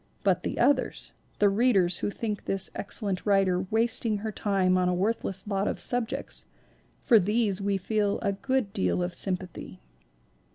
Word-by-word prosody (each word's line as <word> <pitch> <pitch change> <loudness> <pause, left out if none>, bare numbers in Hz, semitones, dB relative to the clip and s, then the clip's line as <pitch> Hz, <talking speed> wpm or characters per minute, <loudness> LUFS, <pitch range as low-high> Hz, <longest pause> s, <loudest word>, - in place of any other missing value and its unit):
But 185 -3 +2
the - - -4
others, 280 +4 +1 0.2
the 205 - +4
readers 195 -5 +3
who - - -1
think 210 0 -4
this 195 -1 +2
excellent 200 -2 -3
writer 190 -2 +2
wasting 225 -1 +1
her 220 +1 -4
time 195 -3 +1
oji 180 -1 +2
a - - +1
worthless 195 0 -1
lot 200 -1 0
of - - -2
subjects, 245 +2 -2 0.6
for 230 - +6
these 205 0 0
we 200 0 0
feel 205 +1 0
a 200 - +1
good 255 0 -1
deal 90 - 0
of 175 0 -3
sympathy. 180 - -4
200 Hz, 160 wpm, -27 LUFS, 185-220 Hz, 0.6 s, for